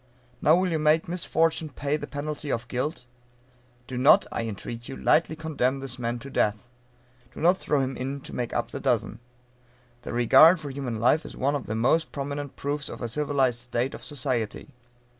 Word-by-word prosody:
Now 155 - +6
will 180 0 +1
you 160 - 0
make 155 +1 +3
misfortune 165 -2 0
pay 140 +1 -2
the 145 -1 -5
penalty 150 0 -4
of 120 +1 -2
guilt? 125 +2 -3 0.8
Do 125 -1 -5
not, 135 +4 +6
I 115 - -2
entreat 115 +3 -7
you, 135 - -6
lightly 160 0 +2
condemn 145 -5 -1
this 130 -2 -6
man 120 0 -2
to 140 - -8
death. 105 -2 0 0.7
Do - - -8
not 175 +3 +4
throw 145 -6 0
him 135 0 -2
in 135 +3 -4
to - - -10
make 120 -1 -2
up - - -2
the - - -5
dozen. - - 0 0.8
The - - -7
regard 155 +9 +6
for 145 -3 -6
human 130 -5 -4
life 125 +7 +3
is - - -10
one 140 +2 +1
of 140 - -4
the 110 - -2
most 130 +9 +2
prominent 140 0 -5
proofs 145 0 -3
of - - -7
a - - -1
civilized 135 -2 0
state 120 +2 -2
of - - -9
society. 130 -2 -3
140 Hz, 195 wpm, -26 LUFS, 125-150 Hz, 0.8 s, Now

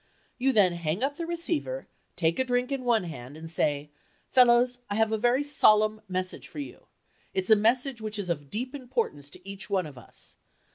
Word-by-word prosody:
You 265 +2 +3
then 200 -7 +4
hang 170 +5 -2
up 285 +2 -1
the 335 - -4
receiver, 340 +8 -2 0.3
take 165 +2 +1
a - - +4
drink 250 0 0
in 270 -2 -2
one 235 -4 +3
hand 145 -4 -8
and 160 +1 -8
say, 150 -2 -1 0.4
"Fellows, 245 -1 +5
I 205 - -1
have 220 0 +2
a 220 - +1
very 245 +5 +3
solemn 215 -7 +4
message 185 0 -3
for - - -13
you. 290 - -8 0.5
It's 190 +3 0
a - - +10
message 235 +3 +2
which 215 0 -3
is 200 -3 -3
of 145 -5 -3
deep 250 - -3
importance 240 - -3
to 170 - -11
each 195 0 -7
one 190 -3 +1
of 140 -4 -10
us. 120 - -11
220 Hz, 200 wpm, -28 LUFS, 175-255 Hz, 0.5 s, a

